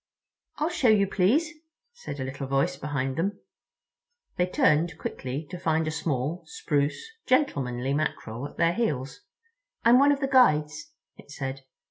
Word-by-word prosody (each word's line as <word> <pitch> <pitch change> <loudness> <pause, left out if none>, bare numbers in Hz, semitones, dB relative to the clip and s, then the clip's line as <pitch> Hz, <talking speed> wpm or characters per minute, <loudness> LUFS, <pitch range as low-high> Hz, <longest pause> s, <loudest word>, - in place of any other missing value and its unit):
"I'll 305 +2 0
show 345 -7 +1
you, 210 -3 +5
please," 220 - +2 0.4
said 480 - -8
a - - -2
little 135 +1 -5
voice 135 0 +1
behind 135 -2 -3
them. 195 +5 -1 1.0
They 180 - +1
turned 160 -2 +2
quickly 135 +2 -5
to 180 - -6
find 160 -2 0
a - - -1
small, 155 +1 -2
spruce, 145 - -1 0.2
gentlemanly 135 - +1
Mackerel 140 -4 -3
at - - -17
their 170 0 +3
heels. 150 - -2 0.6
"I'm 235 +2 +6
one 285 +1 +5
of 285 - +1
the 270 - 0
Guides," 250 - +3 0.2
it - - -16
said. 135 -1 -5
160 Hz, 150 wpm, -26 LUFS, 135-225 Hz, 1.0 s, I'm